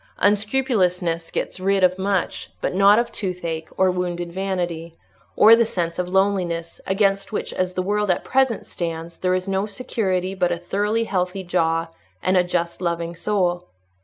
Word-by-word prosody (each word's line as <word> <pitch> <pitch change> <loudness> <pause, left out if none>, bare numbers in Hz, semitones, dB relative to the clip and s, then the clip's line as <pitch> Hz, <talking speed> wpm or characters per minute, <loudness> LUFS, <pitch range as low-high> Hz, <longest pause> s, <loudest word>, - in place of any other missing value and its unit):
Unscrupulousness 200 -6 +1
gets - - -3
rid 195 +1 +1
of 185 +1 +3
much, 195 -1 -1
but - - -2
not 200 +2 +6
of 235 0 +1
toothache, 170 -5 -4
or 190 -1 +4
wounded 175 -1 -3
vanity, 175 -3 -3 0.4
or 225 +2 +8
the 235 - +4
sense 175 -6 -2
of 180 0 -1
loneliness, 185 -3 0
against 195 +1 +1
which, 215 - -3
as 185 0 -2
the 185 - 0
world 210 +1 0
at 180 - +1
present 260 -4 +1
stands, 165 -1 -5
there 185 0 +1
is 185 +1 -3
no 195 +1 0
security 195 -4 -2
but 180 -2 +1
a 175 - 0
thoroughly 205 +6 0
healthy 190 -2 -2
jaw, 165 -2 +1 0.4
and 185 - +2
a 180 - +5
just, 175 -1 -2
loving 170 -1 -2
soul. 180 -2 0
185 Hz, 165 wpm, -22 LUFS, 175-200 Hz, 0.4 s, or